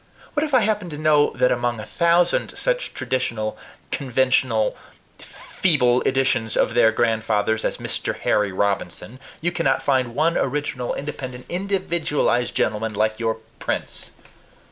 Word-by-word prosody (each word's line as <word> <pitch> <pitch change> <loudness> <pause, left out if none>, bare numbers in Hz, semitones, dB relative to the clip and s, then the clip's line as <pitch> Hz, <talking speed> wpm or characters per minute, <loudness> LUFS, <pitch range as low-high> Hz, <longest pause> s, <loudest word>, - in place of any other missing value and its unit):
What 295 - +1
if 305 - -2
I 250 - +6
happen 210 -4 0
to 150 - -7
know 150 -1 +4
that 125 +1 +3
among 120 -1 0
a 105 - -6
thousand 170 +1 +2
such - - -1
traditional, 115 -4 -2 0.4
conventional, 130 -4 +1 0.4
feeble 125 -9 +1
editions 130 -4 +1
of 115 - +2
their 115 -1 +5
grandfathers 110 -1 0
as - - -1
Mr. - - -2
Harry 105 -2 +1
Robinson, 100 +5 -2 0.2
you 175 +2 0
cannot 165 -6 0
find 130 -4 +1
one 165 +3 +2
original, 140 -4 -2
independent, 130 -3 -6
individualized 170 -9 0
gentleman 110 0 -1
like 110 +1 0
your 115 -1 0 0.2
Prince! - - -4
130 Hz, 135 wpm, -22 LUFS, 115-160 Hz, 0.4 s, I